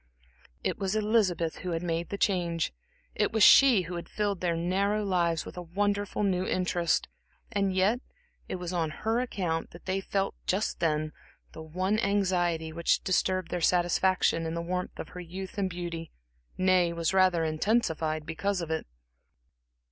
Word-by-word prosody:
It - - -1
was 195 +1 -1
Elizabeth 205 -7 +1
who 180 -1 -4
had 165 +1 -2
made 170 -1 -2
the 200 - -3
change, 170 - 0 0.4
it - - +1
was 220 -2 +3
she 250 -7 +8
who 175 +1 -5
had 170 - -7
filled 205 -3 -1
their 175 -2 +1
narrow 195 +5 0
lives 170 -4 +1
with - - -10
a - - -3
wonderful 205 +4 -1
new 185 -2 +1
interest. 180 -2 0 0.4
And 200 -3 +1
yet, 200 +6 +3 0.5
it - - -2
was 180 -1 -5
on 165 -3 0 0.2
her 225 +2 +2
account 180 -9 -2
that 170 - -14
they 190 +1 -1
felt 195 0 -1
just 195 +4 0
then 155 -2 0 0.4
the 160 - -9
one 185 +7 -1
anxiety 180 -6 +1
which 170 +1 +1
disturbed 185 -1 0
their 180 - -2
satisfaction 175 -1 +2
in 160 - -3
the - - -2
warmth 180 +1 -3
of - - -6
her 180 - -9
youth 185 +3 -7
and 190 -1 +1
beauty, 170 -2 -5 0.5
nay, 185 -2 +3
was 170 +1 -1
rather 185 -3 +4
intensified 160 -2 0
because 185 +5 -1
of 165 -2 -4
it. 160 - -2
180 Hz, 170 wpm, -29 LUFS, 170-195 Hz, 0.5 s, she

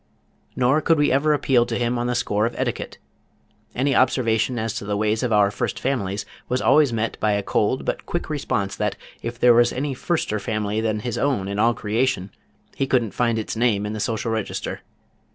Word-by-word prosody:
Nor 130 +5 +3
could 165 0 +3
we 145 0 +3
ever 140 +3 +3
appeal 135 -4 +3
to 115 -1 -2
him 120 0 0
on 120 - -1
the 125 - 0
score 105 -2 +1
of 120 - -7
etiquette. - - -3 0.8
Any 135 +3 +1
observation 120 -2 +2
as 110 -1 -2
to - - -5
the 105 0 -2
ways 110 +1 +1
of 125 -2 -1
our 105 -2 +4
first - - -3
families 100 -7 -2 0.2
was 125 - +1
always 145 0 +4
met 115 0 -2
by 105 -1 +2
a 100 0 0
cold 110 +6 0
but - - -3
quick 175 - -3
response 125 -10 -2
that - - -1 0.3
if 115 +1 -5
there 125 0 +6
was 120 0 +4
any 140 +1 -2
firster 125 -7 -1
family 105 0 -1
than 110 -1 -1
his 120 0 -3
own 130 -9 0
in 100 +1 -3
all 115 +2 +3
creation, 105 -2 -1 0.4
he 135 - -1
couldn't 120 -6 +1
find 120 -2 +1
its 110 - -3
name 110 -3 +1
in 105 - -3
the 110 - -4
social 115 +1 -1
register. 110 -2 -3
115 Hz, 205 wpm, -23 LUFS, 105-130 Hz, 0.8 s, there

